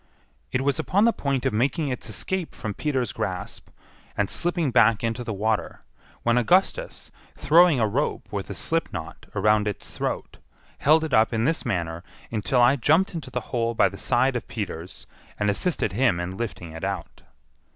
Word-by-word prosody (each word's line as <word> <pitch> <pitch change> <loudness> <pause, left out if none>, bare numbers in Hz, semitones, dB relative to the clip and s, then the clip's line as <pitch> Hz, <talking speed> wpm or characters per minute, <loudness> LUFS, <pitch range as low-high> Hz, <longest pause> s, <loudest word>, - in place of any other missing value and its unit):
It 125 - 0
was 140 -1 0
upon 200 +4 +2
the 235 - +4
point 140 -3 -1
of - - +1
making 140 +7 +1
its 125 -2 -4
escape 170 - -3
from 110 -4 -4
Peter's 130 -1 -1
grasp, 90 0 -5 0.5
and 100 -1 0
slipping 170 -5 0
back 115 -2 +4
into 115 +1 -1
the 115 - -4
water, 110 +1 -1 0.4
when 120 +1 +3
Augustus, 190 - +1 0.3
throwing 165 -3 +5
a 110 - +3
rope 130 +8 -1
with 100 -2 -4
a - - -5
slipknot 95 - -3
around 105 0 +3
its 105 - -5
throat, - - -4 0.4
held 155 +3 +4
it 155 -4 -3
up 110 +1 +4
in 115 0 +1
this 160 -2 0
manner 85 -5 -2 0.3
until 115 +3 +2
I 130 +4 +5
jumped 160 +10 +3
into 155 -6 -6
the 125 -1 -3
hole 115 -1 0
by - - +4
the 100 - -10
side 125 +6 +1
of 120 - -3
Peters, 95 -5 -6 0.3
and 105 -1 +1
assisted 155 - 0
him 110 -4 +2
in 90 +1 -3
lifting 95 -6 -5
it 80 +2 -9
out. 95 -3 -4
120 Hz, 180 wpm, -25 LUFS, 105-145 Hz, 0.5 s, throwing